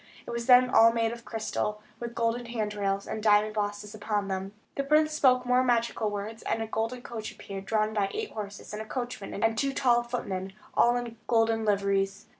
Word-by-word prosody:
It - - -6
was 235 +1 -4
all 250 -2 +7
made 230 -1 0
of 235 0 -9
crystal, 215 -1 -2 0.2
with 235 0 -6
golden 235 +1 0
hand 220 -3 -2
rails, 200 -1 -1
and 215 - -4
diamond 210 0 +4
bosses 205 0 -3
upon 205 -1 -2
them. 190 0 -3 0.2
The 275 - -2
princess 305 +2 +3
spoke 255 -3 +5
some 250 - -8
more 250 +1 +4
magical 235 -3 +1
words, 205 +2 -5
and - - -1
a 225 - -1
golden 225 +3 -3
coach 220 -2 -6
appeared, 195 -1 -8
drawn 215 -1 +1
by 200 -2 +1
eight 440 0 -4
horses, 205 -1 -7
and 210 - -4
a - - -6
coachman, 240 -5 -4
and 225 0 +3
two 275 +4 0
tall 240 -3 +4
footmen, 195 -6 -4 0.2
all 240 +1 +4
in 240 -1 -4
golden 225 -1 +2
liveries. 200 0 +1
225 Hz, 205 wpm, -28 LUFS, 205-240 Hz, 0.2 s, all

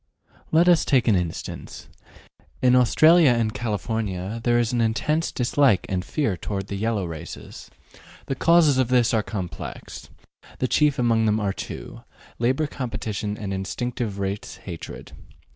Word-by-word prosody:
Let 165 +2 +4
us 175 -2 +5
take 130 -5 +2
an 110 - +5
instance. 90 -3 -5 0.7
In 125 -1 +4
Australia 155 +6 +6
and 110 -2 0
California 105 -1 -3
there 120 0 +3
is 120 0 0
an 120 - +1
intense 150 +9 0
dislike 125 -3 +2
and 90 -1 -1
fear 115 - -1
toward 95 +1 -5
the 100 - -3
yellow 105 -1 -1
races. 85 0 -9 0.6
The - - -2
causes 155 -1 +4
of 130 - +2
this 125 -2 +3
are 110 - +3
complex; 95 -5 -7 0.5
the 130 - 0
chief 150 +1 +2
among 115 -3 +2
them 105 +1 +2
are 100 -2 -1
two, - - -8 0.4
labor 130 +6 +1
competition 110 -6 -4
and 100 -3 -4
instinctive 105 +2 -3
race 100 +1 -4
hatred. 85 -4 -8
115 Hz, 145 wpm, -24 LUFS, 100-130 Hz, 0.7 s, Australia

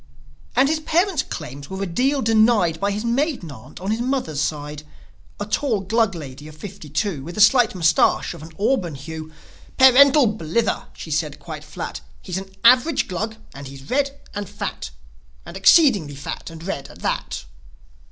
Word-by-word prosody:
And 275 - +5
his 310 +2 +1
parents' 335 +1 +1
claims 140 -2 -8
were 190 +1 -4
a - - 0
deal 260 +10 0
denied 215 -7 +3
By 200 - 0
his 210 +3 -3
maiden 245 - -1
aunt 125 -1 -12
on 190 +3 -3
his 225 +2 -1
mother's 245 - -1
side, 150 0 -3 0.6
A 205 - -2
tall 220 0 0
Glug 215 0 +1
lady 145 -2 -9
of 155 0 -12
fifty 195 -3 -9
two 155 -1 -2
With 170 +6 -8
a - - -2
slight 225 +1 +5
moustache 165 -1 +2
of 170 - -11
an 160 - -9
auburn 200 - 0
hue. 155 +3 -8 0.5
"Parental 270 +2 +7
blither!" 210 0 -1
she 160 - -9
said 150 -1 -1
quite 150 0 -8
flat. 150 - -6 0.2
"He's 180 - -4
an 195 0 -10
average 255 +6 +5
Glug; 215 +5 -3 0.2
and 140 0 -9
he's 135 +1 -11
red 280 +1 0
and 205 -2 -5
fat! 205 - -5 0.6
And 170 - -10
exceedingly 195 - +5
fat 140 - -6
and 165 0 -10
red 145 -7 -4
at - - -14
that!" - - -2
195 Hz, 175 wpm, -22 LUFS, 155-240 Hz, 0.6 s, Parental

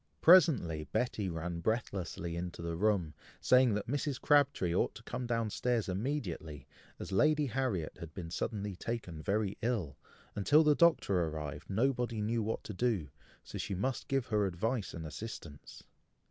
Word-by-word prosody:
Presently 140 - +5
Betty 100 - -1
ran 85 0 -4
breathlessly 90 -4 -2
into 85 0 -5
the 85 0 -3
room, 95 -4 +1 0.3
saying 125 -4 +4
that 105 - -2
Mrs. 140 0 -2
Crabtree 145 - +3
ought 90 - +1
to 110 - -11
come 125 +1 -4
down 115 -2 0
stairs 120 -2 0
immediately, 95 - -3 0.3
as - - -7
Lady 150 +10 +3
Harriet 120 - -2
had 85 -2 -8
been 85 -3 -6
suddenly 105 0 -3
taken 90 -7 -5
very 100 +2 -1
ill, 105 - -2 0.4
and, 100 - -2
till 150 +9 +6
the 150 -1 +5
Doctor 120 - +3
arrived, 75 -3 -6
nobody 120 +1 0
knew 115 +2 0
what 110 +1 -2
to 105 - -6
do, 100 -8 0 0.3
so - - -7
she 100 - -3
must 125 +8 -2
give 135 -2 0
her 105 -4 +1
advice 110 +5 -2
and 80 -1 -6
assistance. 75 - -8
105 Hz, 160 wpm, -33 LUFS, 85-125 Hz, 0.4 s, till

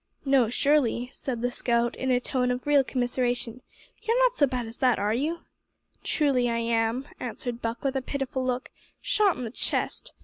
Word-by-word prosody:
"No, 270 -5 +4
surely," 250 -2 +2
said 245 -3 -4
the 245 - +1
scout, 235 -1 0
in 260 - -2
a 250 -1 +4
tone 250 0 0
of 250 0 -2
real 290 -2 +5
commiseration, 245 -1 -1 0.4
"you're 460 +1 +1
not - - +5
so 295 - +3
bad 250 -2 -2
as 225 +1 -8
that, 255 -2 +3
are 205 +1 0
you?" 310 +8 -1 0.6
"Truly 270 -5 +2
am 230 +2 0
I," - - -6
answered 240 0 -4
Buck, 230 +1 -3
with 275 -1 0
a 265 - +1
pitiful 265 -1 -3
look, 255 0 -2 0.3
"shot 425 -7 +2
in 250 - -4
the 225 - -4
chest. - - -2
250 Hz, 190 wpm, -27 LUFS, 240-275 Hz, 0.6 s, real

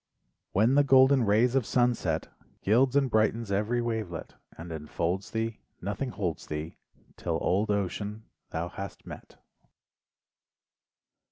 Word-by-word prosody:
When 110 +6 +3
the 145 +1 +5
golden 130 -2 +6
rays 110 +4 +3
of 135 -1 +3
sunset 115 -10 +1 0.4
Gilds 125 +6 +3
and 140 -1 +4
brightens 110 -1 +1
every 110 +5 +1
wavelet, 110 -8 -4 0.2
And 85 +1 -8
enfolds 85 +4 -2
thee, 115 0 -2 0.2
Nothing 100 +7 -3
holds 95 -8 -3
thee 75 +2 -5 0.4
'Till - - -1
old 100 +4 +1
ocean 105 +2 -2 0.3
thou 80 +2 -3
hast 95 +1 -8
met. - - -11
105 Hz, 120 wpm, -28 LUFS, 95-120 Hz, 0.4 s, golden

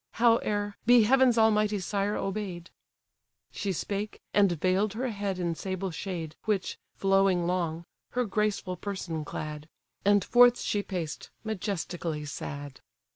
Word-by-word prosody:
Howe'er, 210 -3 +2
be 240 -2 +7
heaven's 255 +1 +4
almighty 215 -1 +3
sire 200 +2 -1
obey'd—" 190 -3 -4 0.8
She 200 - -2
spake, 200 +4 -3
and 200 -3 +5
veil'd 185 +5 +1
her 250 +3 -2
head 200 -3 -3
in 175 -2 -1
sable 185 +2 -3
shade, 165 -1 -5
Which, 205 -4 -1 0.2
flowing 195 -2 +3
long, 170 -2 -1 0.3
her 250 0 +1
graceful 205 -3 -1
person 175 -5 -4
clad; 150 +1 -6 0.3
And 205 -1 +4
forth 245 0 +6
she 205 - 0
paced, 175 -6 -5
majestically 180 -7 -3
sad. 145 -1 -6
195 Hz, 130 wpm, -29 LUFS, 175-210 Hz, 0.8 s, be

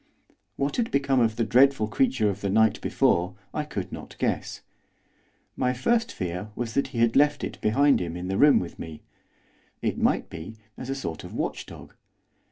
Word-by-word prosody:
What 140 +1 -1
had 235 -2 +1
become 140 -1 +2
of 115 -2 +2
the 115 - 0
dreadful 125 0 +4
creature 115 0 +1
of 100 +1 -8
the 100 - -1
night 110 +1 +3
before 90 +2 +1 0.2
I 150 - -1
could 100 -11 -5
not - - -9
guess. - - -2 0.9
My 125 0 +1
first 230 - +1
fear 90 +3 -4
was 115 -2 -4
that 140 - +1
he 130 -3 -8
had 115 0 +3
left 145 +1 +3
it - - -5
behind 140 +5 +3
him 85 -1 -4
in 90 +1 -5
the 95 +1 -1
room 145 0 +7
with 90 - -7
me, 80 -2 -8 0.8
it - - -2
might - - +1
be, 85 +6 -8 0.2
as 130 - -8
a 135 - -1
sort 85 -12 -5
of - - -9
watchdog. - - -5
115 Hz, 185 wpm, -26 LUFS, 95-140 Hz, 0.9 s, room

